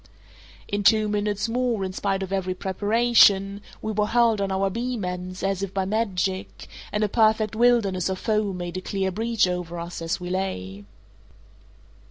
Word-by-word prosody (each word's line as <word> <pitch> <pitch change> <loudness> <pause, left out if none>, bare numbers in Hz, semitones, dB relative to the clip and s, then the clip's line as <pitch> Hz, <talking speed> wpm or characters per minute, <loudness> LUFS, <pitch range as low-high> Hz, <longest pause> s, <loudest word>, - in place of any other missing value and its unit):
In 205 0 -1
two 215 +1 +4
minutes 205 0 -1
more, 235 -3 0
in 185 - -5
spite 195 0 -1
of 190 0 -5
every 185 -1 -1
preparation, 205 0 +3 0.2
we 220 - -2
were 210 0 0
hurled 230 -2 +3
on 195 -1 -1
our 195 0 0
beam 235 -1 -3
ends, 180 0 -5
as 195 -1 0
if 195 -1 -4
by 190 -1 0
magic, 195 -3 -2 0.2
and 210 +1 0
a - - +3
perfect 220 0 +2
wilderness 215 -7 +2
of 190 - -2
foam 210 -2 -1
made 175 0 -5
a - - -4
clear 190 0 -2
breach 225 +1 +1
over 175 -1 -4
us 170 0 -6
as 165 0 -2
we 180 0 -5
lay. 100 - -4
195 Hz, 175 wpm, -24 LUFS, 185-215 Hz, 0.2 s, two